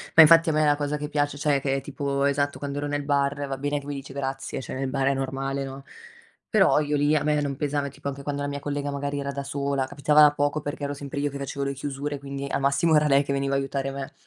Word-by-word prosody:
ma 160 - +11
infatti 165 +1 +7
a - - +3
me 155 0 +2
la 145 0 +4
cosa 145 0 -2
che 150 - -4
piac 145 -1 0
cioè 145 -1 +1
che 135 -1 0
è 135 - -2
tipo 140 0 -2
esatto, 140 0 +1
quando 140 0 -4
ero 145 - -2
nel 145 0 -2
bar, 140 0 0
va 135 - -3
bene 145 +1 -1
che 145 - -13
mi 145 - -4
dici 135 -1 -8
grazie, 135 -1 -4
cioè - - -7
nel 135 0 -2
bar 135 0 0
è - - +2
normale, 135 +1 -2
no, 135 0 -8 0.6
però 195 -8 +4
io 150 -1 0
lì 145 +2 +3
a 145 - +1
me 150 0 +2
non 140 -1 -2
pesava 145 0 -1
tipo, 140 +1 -8
anche 140 0 -5
quando 145 0 -3
la 145 - -1
mia 140 0 -4
collega 145 0 -3
magari 140 0 -3
era 140 0 -3
da 140 0 -4
sola, 140 -1 -1
capitava 150 +2 +5
poco 145 +1 0
perché, 145 0 -4
ero 140 - -3
sempre 140 0 -6
io 145 0 0
che 140 - -7
facevo 140 0 -4
le 140 - -1
chiusure, 140 +1 -4
quindi 140 0 -6
al - - -1
massimo 140 +4 +3
era 150 0 +4
lei 140 0 +4
che 140 - -4
veniva 140 0 -1
a - - +3
aiutare 135 0 -2
me. 135 0 -6
140 Hz, 280 wpm, -25 LUFS, 140-145 Hz, 0.6 s, ma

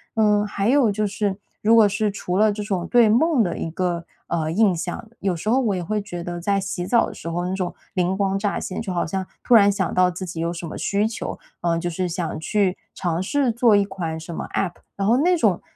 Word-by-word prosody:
嗯， 210 -2 +3
还 200 0 -1
有 255 -4 +4
就 210 +1 -1
是， 200 -1 -1 0.2
如 225 +2 +5
果 220 -2 +7
是 205 +1 0
除 185 -3 -4
了 215 0 +5
这 205 0 -4
种 190 -4 -2
对 240 -2 +5
梦 255 +2 +4
的 175 - -2
一 - - -3
个， 170 0 -2 0.3
嗯， 160 -1 0
印 210 -4 +4
象， 175 +6 -5
有 190 -3 0
时 215 +7 -3
候 255 - +4
我 220 -7 +1
也 180 - -3
会 210 +4 -1
觉 175 -4 -6
得 175 0 -5
在 200 +3 +1
洗 185 -2 -4
澡 235 - +4
的 - - -8
时 170 - -7
候， 175 +1 -2
那 180 - -2
种 185 -2 -3 0.2
灵 180 0 +1
光 195 0 0
乍 200 0 -1
现， 185 - -4
就 190 -5 -4
好 175 - 0
像 190 +3 -3 0.2
突 - - +2
然 205 -2 +7
想 195 -3 -1
到 180 0 +4
自 180 +1 -5
己 170 -2 -6
有 170 +1 -1
什 170 0 -6
么 160 - -6
需 205 +1 0
求， 220 - -4 0.2
嗯， 170 -1 +1
就 175 - -2
是 180 +2 -2
想 170 -2 -3
去 190 +2 0 0.2
尝 170 -2 -1
试 265 +6 +1
做 230 -2 +4
一 205 - +4
款 180 -5 -4
什 165 +1 -8
么 - - -4
App， 190 -3 0 0.2
然 195 - -2
后 235 +4 +4
那 355 +5 +3
种 205 - +2
195 Hz, 280 characters per minute, -23 LUFS, 175-215 Hz, 0.3 s, 果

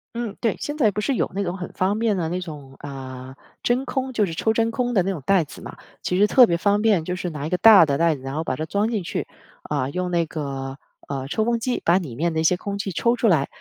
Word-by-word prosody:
嗯， 230 -4 -4
对， 225 -3 0
现 295 +1 -4
在 225 -8 +3
不 205 - -3
是 265 +5 0
有 - - -1
那 200 - -2
种 175 -1 -3
很 180 - -6
方 195 +3 0
便 220 -3 +1
的 170 -3 -1
那 180 +3 -2
种 145 -6 -9
啊， 130 -2 -8 0.3
真 250 +3 +1
空， 265 0 -2
就 215 -4 +1
是 165 - -5
抽 220 - +1
真 225 +1 +1
空 245 +1 -1
的 190 -5 +3
那 195 - -1
种 155 -8 -6
袋 190 -5 +3
子 - - -12
嘛。 - - -9 0.2
其 180 - -1
实 205 +2 +5
特 250 +3 +7
别 170 -5 0
方 205 +3 +2
便， 205 -7 +2
就 180 - -2
是 180 0 -3
拿 150 -2 -5
一 - - -5
个 180 - +1
大 210 -6 +8
的 140 -1 0
袋 165 0 +3
子， 130 - -14
然 135 +2 -5
后 160 - -1
把 130 -5 -3
它 155 - -3
装 205 +6 0
进 210 -5 -1
去， - - -3 0.4
啊， 140 -3 -2
用 180 +4 -3
那 170 -1 +2
个， 135 -4 -5 0.3
呃， 135 -1 -4
抽 220 +7 0
风 235 -1 +1
机 250 0 -1
把 170 +2 +5
里 150 -11 -5
面 165 +5 0
的 160 - 0
一 - - -1
些 175 +3 +3
空 200 +1 -4
气 200 -1 -3
抽 235 +8 +1
出 230 -2 +2
来。 155 -6 +3
180 Hz, 310 characters per minute, -23 LUFS, 155-220 Hz, 0.4 s, 大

